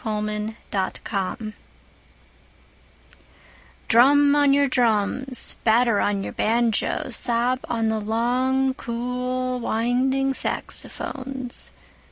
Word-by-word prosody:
Jazz 215 -1 -3 0.3
Fantasia 200 +2 -4 2.3
DRUM 285 +5 +5
on 290 -1 +4
your 280 0 +3
drums, 245 +1 0
batter 230 -1 +3
on 200 -1 0
your - - -6
banjoes, 230 0 0
sob 245 +1 +2
on 225 -2 0
the 220 0 -1
long 255 +5 0
cool 250 +1 -3
winding 255 +4 0
saxophones. 260 -1 -1
245 Hz, 85 wpm, -23 LUFS, 220-260 Hz, 2.3 s, DRUM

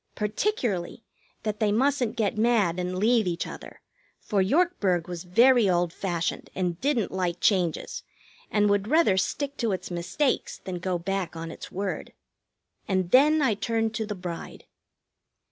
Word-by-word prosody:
Particularly 215 - -2 0.4
that 215 0 -2
they 215 -2 +2
mustn't 245 0 +1
get 220 -3 0
mad 215 -6 +2
and 180 0 -2
leave 220 +1 +3
each 170 -1 -1
other, - - -10 0.4
for 205 -3 0
Yorkburg 200 - +1
was 175 0 -6
very 235 +3 +5
old 175 -1 +1
fashioned 175 -4 -3
and 180 -2 -2
didn't 260 -6 +1
like 180 -2 -2
changes, 180 -6 0 0.5
and 210 -1 +2
would 205 0 +1
rather 305 - +4
stick 280 +9 -1
to 230 -5 0
its 185 - -5
mistakes 175 - -1
than 180 -2 -6
go 180 0 -1
back 185 0 -3
on 165 0 -6
its - - -9
word. 195 0 -4 0.7
And 185 -3 0
then 300 +4 +5
I 245 -5 +3
turned 225 +1 -1
to 220 -1 -3
the 210 - -4
bride. 175 -2 -7
200 Hz, 155 wpm, -26 LUFS, 180-235 Hz, 0.7 s, very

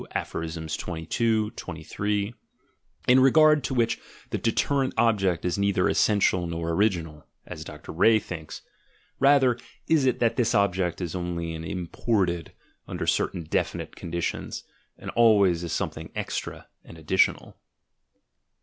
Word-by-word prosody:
Aphs. 80 -1 -4
22, 105 +6 -1
23, 100 +6 -3 0.7
in 125 +1 +6
regard 150 +2 +5
to 135 - -2
which 115 -2 +1 0.3
the - - -1
deterrent 135 +4 0
object 95 -8 +2
is 90 +2 -1
neither 100 -2 +2
essential 95 -4 +2
nor 85 0 -3
original 85 -5 -1 0.2
(as - - -7
Dr. - - -10
Ree 110 +7 +5
thinks:— 85 -7 -7 0.6
rather 135 -3 +4 0.3
is 150 -5 +3
it 130 - +2
that 115 -1 +1
this 120 -4 +2
object 95 -3 +1
is 85 -3 -3
only 85 -2 -3
imported, 85 +2 -2 0.4
under - - -4
certain 85 - 0
definite 80 - -2
conditions, 85 0 -4 0.3
and - - -7
always 100 -7 +4
as 85 - -4
something - - -3
extra - - -4 0.2
and 85 - -13
additional). 80 +4 +1
95 Hz, 125 wpm, -26 LUFS, 85-115 Hz, 0.7 s, in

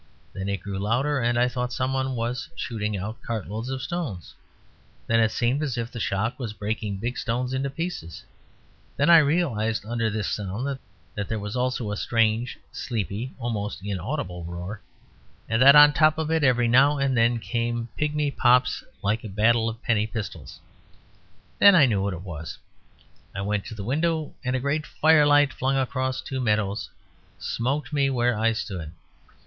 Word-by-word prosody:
Then 95 0 -4
it 100 -3 -2
grew 100 -1 -4
louder, 130 +8 +1
and 120 -1 +1
I 120 +1 +4
thought 125 0 -3
somebody 130 +1 -1
was 125 0 -3
shooting 105 -3 -3
out 110 +4 -6
cartloads 110 +1 -4
of 130 -1 -4
stones; 140 - -4 0.7
then 115 0 +2
it 110 -1 +4
seemed 120 +6 0
as 135 -5 -2
if 115 +1 -3
the 120 - -6
shock 110 +5 -1
was 115 -5 -4
breaking 105 0 -3
big 120 +5 -3
stones 125 +2 -2
into 135 +1 -1
pieces. 145 - -5 0.7
Then 145 +4 +4
I 165 - +10
realised 140 -9 +1
that 105 - -12
under 115 -2 0
this 105 -2 -2
sound 115 +8 -3 0.3
there 105 +2 -3
was 105 +2 -5
also 125 -3 -1
a 105 - -3
strange, 115 +1 +1
sleepy, 115 0 -4
almost 105 -6 -4
inaudible 95 - -4
roar; 90 +5 -6 0.7
and 115 +1 +1
that 140 +2 +9
on 145 0 +9
top 155 +1 +4
of 160 0 -2
it 160 -1 +2
every 125 -3 +3
now 135 +5 +5
and 135 -1 +1
then 120 0 +3
came 120 0 -2
pigmy 150 -1 0
pops 125 -1 +3 0.2
like 110 +3 0
a 110 - -6
battle 115 +3 +2
of 115 +2 -9
penny 110 -3 +1
pistols. 110 -2 -7 1.0
Then 200 -1 +8
I 155 -6 +7
knew 105 -6 +1
what 100 -1 -1
it 90 - -9
was. 85 -4 -7 0.8
I 95 - -3
went 105 0 -1
to 110 - -7
the 100 - -6
window; 155 +6 -1
and 125 0 -1
a - - 0
great 145 +4 -1
firelight 145 -2 +4
flung 135 +1 0
across 130 0 -1
two 130 -1 -4
meadows 105 -2 0 0.5
smote 135 +6 -2
me 140 -2 +2
where 120 -2 +1
I 115 +2 +2
stood. 90 -8 -5
120 Hz, 175 wpm, -25 LUFS, 105-135 Hz, 1.0 s, I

